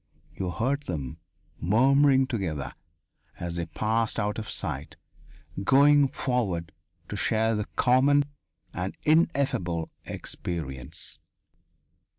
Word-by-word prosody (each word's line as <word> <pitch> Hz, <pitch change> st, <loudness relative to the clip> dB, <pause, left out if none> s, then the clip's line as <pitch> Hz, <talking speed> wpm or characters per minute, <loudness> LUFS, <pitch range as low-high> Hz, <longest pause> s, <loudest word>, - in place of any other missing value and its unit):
You 95 Hz, -, -3 dB
heard 135 Hz, +10 st, -1 dB
them, 80 Hz, -3 st, -4 dB, 0.4 s
murmuring 135 Hz, -, +4 dB
together, 95 Hz, -, -3 dB, 0.7 s
as 85 Hz, 0 st, -3 dB
they 85 Hz, -1 st, -2 dB
passed 110 Hz, +7 st, 0 dB
out 105 Hz, 0 st, -1 dB
of 110 Hz, -, -6 dB
sight, -, -, -3 dB, 0.7 s
going 140 Hz, +4 st, +6 dB
forward 100 Hz, -, -1 dB, 0.4 s
to -, -, -4 dB
share 110 Hz, +2 st, +2 dB
the 105 Hz, -1 st, -1 dB
common 135 Hz, +3 st, +4 dB, 0.5 s
and 90 Hz, +2 st, -4 dB
ineffable 140 Hz, -, +2 dB
experience. 75 Hz, -2 st, -5 dB
110 Hz, 100 wpm, -27 LUFS, 85-135 Hz, 0.7 s, going